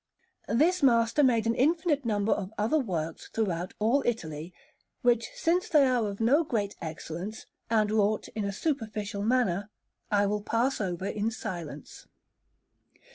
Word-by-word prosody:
This 325 +10 +3
master 235 0 +4
made 235 -5 +3
an 230 - +2
infinite 300 +1 +1
number 210 -1 +1
of 195 -1 -1
other 225 +10 +2
works 165 - -3
throughout 185 -5 -2
all 235 +7 +2
Italy, 160 -8 -3 0.5
which, 240 -2 +3
since 350 +2 +1
they 300 -4 +5
are 245 -4 +2
of 200 - -7
no 265 +9 +4
great 210 -8 -2
excellence, 165 +6 -6 0.2
and 215 -2 +2
wrought 215 0 +1
in 215 - -4
a 200 - -1
superficial 215 -5 -3
manner, 215 -4 +1 0.4
I 205 -1 +3
will 210 +1 -1
pass 230 +4 0
over 185 -2 -3
in 210 +2 -1
silence. 170 - -7
220 Hz, 145 wpm, -28 LUFS, 200-250 Hz, 0.5 s, they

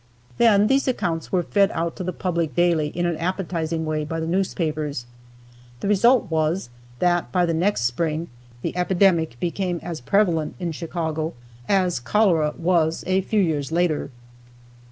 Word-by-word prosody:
Then 210 -4 +5
these 270 +5 +2
accounts 170 -10 -1
were 180 -2 +2
fed 200 +3 +3
out 165 +1 -2
to - - -4
the 180 - -2
public 170 -6 -2
daily 170 -3 +2
in 175 +4 -2
an 170 -2 0
appetizing 165 -2 -2
way 155 -1 -1
by 165 +2 -4
the 160 - -2
newspapers. 155 -7 -1 0.7
The - - -3
result 210 0 +4
was 160 -3 0 0.3
that 175 -6 +1
by 180 +6 +2
the 165 - 0
next 180 - +1
spring 155 +7 -1 0.4
the - - -3
epidemic 180 -7 +2
became 175 0 -2
as 165 -6 -5
prevalent 165 +1 +1
in 175 -2 -2
Chicago 160 -1 -3 0.3
as 185 -7 +2
cholera 165 - +2
was 165 -2 +1
a 185 +1 +2
few 210 +2 +1
years 155 -5 -1
later. 165 -4 0
170 Hz, 155 wpm, -23 LUFS, 160-185 Hz, 0.7 s, Then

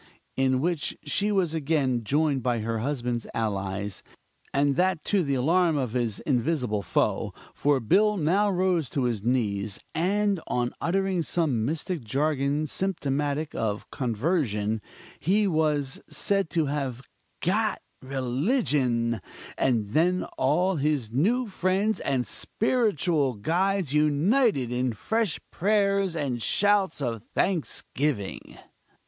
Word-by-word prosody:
in 130 -1 +2
which 170 +1 -1
she 200 +8 0
was 185 -6 +1
again 140 -6 0
joined 145 +2 +1
by 120 -2 0
her 115 +1 -2
husband's 120 -2 -2
allies, 100 -3 -2 0.5
and 140 0 +2
that 180 -2 +1
to 200 -2 +2
the 140 -3 0
alarm 165 +5 +3
of 125 -5 -2
his 120 -5 0
invisible 125 -5 0
foe; - - 0 0.2
for 145 -1 +2
Bill 205 - +3
now 190 +6 +2
rose 180 -6 +1
to 135 - -1
his 120 -4 0
knees, 105 -5 0
and 195 +2 +1
on 120 0 -1
uttering 190 +1 +1
some 155 -9 0
mystic 160 +1 -2
jargon 140 +4 0
symptomatic 150 -3 -1
of 105 -2 -3
conversion, 115 - 0 0.4
he 205 +6 +2
was 150 -5 0
said 195 -4 +1
to 165 -2 +1
have 135 -3 -3 0.4
"got 210 +3 +1 0.2
religion"; 130 - 0 0.3
and 115 -6 +1
then 175 - +2
all 175 +7 +2
his 140 -6 0
new 215 - +2
friends 195 +1 0
and 130 -3 0
spiritual 180 - 0
guides 175 - 0
united 150 - +2
in 125 0 0
fresh 220 - -1
prayers 200 -2 +1
and 135 -6 -2
shouts 200 - +2
of 115 -4 -2
thanksgiving. 150 - -2
145 Hz, 120 wpm, -26 LUFS, 125-185 Hz, 0.5 s, alarm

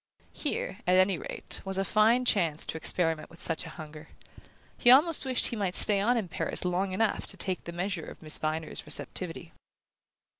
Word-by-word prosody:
Here, 290 -9 -3
at 180 - +4
any 185 -2 +3
rate, - - -3
was 195 0 -2
a 195 - 0
fine 225 +5 +3
chance 170 -9 0
to - - -5
experiment 165 -1 0
with 170 - -17
such 165 - -3
a - - -11
hunger: 155 -1 -10 0.7
he 240 - +3
almost 295 +4 +6
wished 260 -2 -1
he - - -5
might 195 -4 -2
stay 200 -2 +6
on 240 +4 +2
in 215 -5 -2
Paris 170 - -2
long 185 +2 -1
enough 215 +3 -1
to - - -4
take 185 -2 0
the 170 - -6
measure 175 -1 -4
of - - -12
Miss 155 0 +1
Viner's 155 +1 -3
receptivity. - - -4
185 Hz, 190 wpm, -28 LUFS, 165-215 Hz, 0.7 s, almost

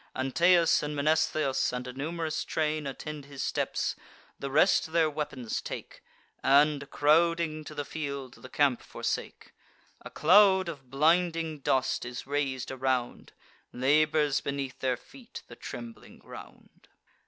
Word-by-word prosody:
Anteus 170 +6 +3
and 150 0 -4
Mnestheus, 155 -1 +1
and 125 0 -4
a 125 - -7
num'rous 160 +3 -3
train, 155 -1 -1
Attend 145 +1 -7
his 140 -1 -6
steps; - - -1 0.4
the 140 - -4
rest 185 +7 +3
their 160 -2 +3
weapons 135 -6 -4
take, - - -8 0.4
And, 140 0 +3
crowding 160 +1 +2
to 150 - -9
the 145 -1 -3
field, 140 -4 -6
the 130 - -11
camp 140 -4 +2
forsake. - - -5 0.5
A - - -9
cloud 190 +2 +5
of 135 -6 -9
blinding 165 +2 +1
dust 130 -1 0
is 125 0 -6
rais'd 135 -3 -2
around, 130 -2 -2 0.4
Labours 150 +2 +2
beneath 140 -2 -4
their 130 -2 0
feet 250 - -13
the - - -11
trembling 230 -1 -9
ground. - - -14
150 Hz, 130 wpm, -29 LUFS, 135-160 Hz, 0.5 s, cloud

